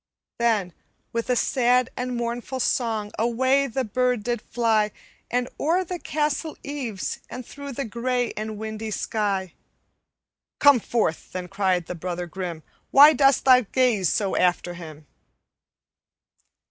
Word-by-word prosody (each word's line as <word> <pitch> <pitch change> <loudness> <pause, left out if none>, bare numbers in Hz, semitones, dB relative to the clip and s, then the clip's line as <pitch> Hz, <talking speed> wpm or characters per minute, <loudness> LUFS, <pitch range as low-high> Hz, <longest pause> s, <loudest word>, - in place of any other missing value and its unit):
"Then, 215 -7 +1 0.4
with 230 +1 -2
a 250 - +3
sad 250 0 +2
and 250 0 -3
mournful 240 +2 -3
song, 220 -4 0
Away 260 +4 +2
the 265 +1 -2
bird 250 0 0
did 240 -1 -2
fly, 220 -3 +1 0.4
And 245 +1 0
o'er 340 +5 +2
the 360 0 -5
castle 300 +1 -2
eaves, 260 -9 -4
and 250 -1 -7
through 280 +2 -8
The 275 +2 -3
gray 245 +2 -1
and 215 0 -4
windy 220 0 -5
sky. 200 -3 -2 1.0
'Come 285 -3 +6
forth!' 215 -8 -1
then 180 -1 -4
cried 185 -2 0
the - - -5
brother 175 +1 -4
grim, 175 -2 -6 0.3
'Why 290 +3 +8
dost 275 -2 +3
thou 255 -1 +7
gaze 230 -6 +1
so 200 -3 0
after 180 -1 +1
him?' 155 -3 -10
235 Hz, 135 wpm, -24 LUFS, 200-255 Hz, 1.0 s, Why